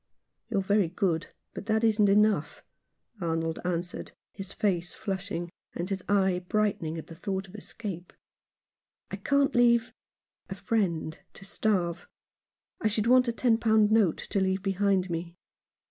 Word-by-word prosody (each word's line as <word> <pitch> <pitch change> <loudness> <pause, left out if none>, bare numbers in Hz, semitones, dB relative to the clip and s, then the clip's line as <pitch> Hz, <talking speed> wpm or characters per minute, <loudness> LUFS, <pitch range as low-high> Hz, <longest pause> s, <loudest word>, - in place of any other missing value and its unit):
"You're 200 -4 0
very 200 -1 +3
good, 175 -2 0 0.3
but 205 - -8
that 220 +1 +2
isn't 215 -2 +4
enough," 200 -7 +2 0.6
Arnold 165 -1 -1
answered, 180 0 -3 0.2
his 195 -2 -7
face 175 -4 -1
flushing 190 -4 -4 0.2
and 175 +3 -3
his 190 -1 -2
eye 190 -3 +2
brightening 195 -7 0
at 160 - -6
the - - -11
thought 190 +3 -4
of 180 - -16
escape. 200 -4 -6 1.0
"I - - -3
can't 280 -1 +2
leave 235 -1 +4 0.3
— - - -50
a - - -4
friend 170 -8 -1
— - - -47
to 195 - -11
starve. 180 -4 -1 0.7
I 220 - +2
should 215 0 0
want 250 +1 +5
a - - +2
ten 230 -1 +2
pound 220 -2 +4
note 215 -7 +4
to 200 - +2
leave 190 0 0
behind 195 -2 +1
me." 170 +1 -4
195 Hz, 155 wpm, -28 LUFS, 175-215 Hz, 1.0 s, want